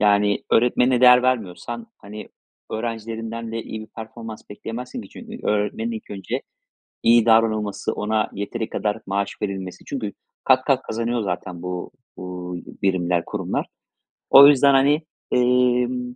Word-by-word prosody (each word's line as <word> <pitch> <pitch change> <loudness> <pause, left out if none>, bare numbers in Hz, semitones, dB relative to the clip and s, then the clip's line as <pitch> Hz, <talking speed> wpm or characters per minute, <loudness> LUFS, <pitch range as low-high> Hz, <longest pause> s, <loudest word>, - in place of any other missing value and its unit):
yani, 105 0 +3
öğretmenine 125 +1 +3
değer 125 0 +8
vermiyorsan, 120 -1 -2
hani, 105 +2 -10 0.4
öğrencilerinden 115 0 -4
de 115 - -3
iyi 110 - -7
bir 110 - -9
performans 110 0 -8
bekleyemezsin 120 - -6
ki. - - -13
Çünkü 230 -1 -9
öğretmenin 105 +2 0
ilk 110 - -8
önce, 100 -1 -4 0.6
iyi 115 -1 +5
davranılması, 110 -3 +2
ona 110 +1 0
yeteri 110 +3 -4
kadar 105 0 -1
maaş 100 +1 -1
verilmesi. 95 -3 -4
Çünkü 110 -8 -4 0.3
kat 130 0 +4
kat 135 -2 +2
kazanıyor 115 +1 -2
zaten 90 -2 -4
bu, 90 -1 -5 0.2
uuu, 90 -1 -6 0.3
birimler, 90 -3 +1
kurumlar. - - -3 0.6
O 140 +1 +10
yüzden, 140 -1 +6
hani, 140 +3 +4 0.3
emm, 125 0 +2
115 Hz, 135 wpm, -22 LUFS, 100-125 Hz, 0.6 s, O